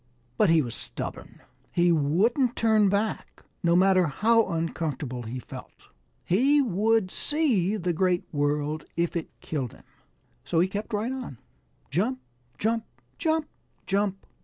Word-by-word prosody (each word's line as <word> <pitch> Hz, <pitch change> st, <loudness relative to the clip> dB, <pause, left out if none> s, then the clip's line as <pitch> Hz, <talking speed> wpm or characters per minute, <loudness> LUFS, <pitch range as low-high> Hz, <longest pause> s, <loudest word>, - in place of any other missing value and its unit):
But 210 Hz, -, +3 dB
he 165 Hz, -2 st, +5 dB
was 120 Hz, -3 st, -5 dB
stubborn. -, -, -7 dB, 0.3 s
He 175 Hz, 0 st, +3 dB
wouldn't 205 Hz, -, +2 dB
turn 215 Hz, -3 st, +4 dB
back, 205 Hz, +2 st, -2 dB, 0.2 s
no 170 Hz, -1 st, +3 dB
matter 185 Hz, -1 st, +5 dB
how 225 Hz, +9 st, +3 dB
uncomfortable 155 Hz, -6 st, -3 dB
he 120 Hz, +2 st, -5 dB
felt. 125 Hz, -, -11 dB, 0.4 s
He 270 Hz, +11 st, +4 dB
would 220 Hz, -4 st, +2 dB
see 225 Hz, -, +1 dB
the 175 Hz, -3 st, -1 dB
Great 180 Hz, +1 st, +1 dB
World 150 Hz, +1 st, 0 dB
if 170 Hz, 0 st, 0 dB
it 170 Hz, -, -3 dB
killed 135 Hz, -7 st, -3 dB
him. -, -, -17 dB, 0.6 s
So 165 Hz, -, 0 dB
he 180 Hz, -, +4 dB
kept 205 Hz, +4 st, -5 dB
right 220 Hz, +4 st, -1 dB
on, 255 Hz, -, -6 dB, 0.5 s
jump, 220 Hz, -, 0 dB, 0.4 s
jump, 225 Hz, +5 st, 0 dB, 0.4 s
jump, 320 Hz, -2 st, +1 dB, 0.4 s
jump. 195 Hz, 0 st, -1 dB
185 Hz, 135 wpm, -27 LUFS, 160-225 Hz, 0.6 s, he